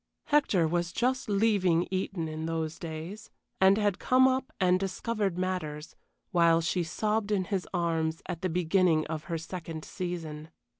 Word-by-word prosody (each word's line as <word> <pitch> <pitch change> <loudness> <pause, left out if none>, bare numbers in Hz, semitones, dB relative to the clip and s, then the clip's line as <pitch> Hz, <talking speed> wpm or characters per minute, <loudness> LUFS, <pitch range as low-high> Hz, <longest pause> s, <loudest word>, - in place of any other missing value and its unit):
Hector 245 - +3
was 175 +1 -1
just 255 +3 0
leaving 195 -5 +3
Eton 185 -3 -2
in 155 +1 -4
those 160 -1 -3
days, 165 +6 -7 0.3
and 190 +1 +6
had 205 -3 +1
come 260 +1 +5
up 260 +2 0
and 185 -1 +3
discovered 195 0 -2
matters, 175 -5 -3 0.4
while 170 -1 +5
she 170 +2 0
sobbed 210 +5 -1
in 200 -3 +1
his 185 0 -2
arms, 165 -2 -1
at 175 -3 -4
the 185 - 0
beginning 175 -1 +2
of 155 0 -5
her 165 +1 -2
second 165 -1 -6
season. 165 -4 -5
180 Hz, 155 wpm, -29 LUFS, 165-200 Hz, 0.4 s, and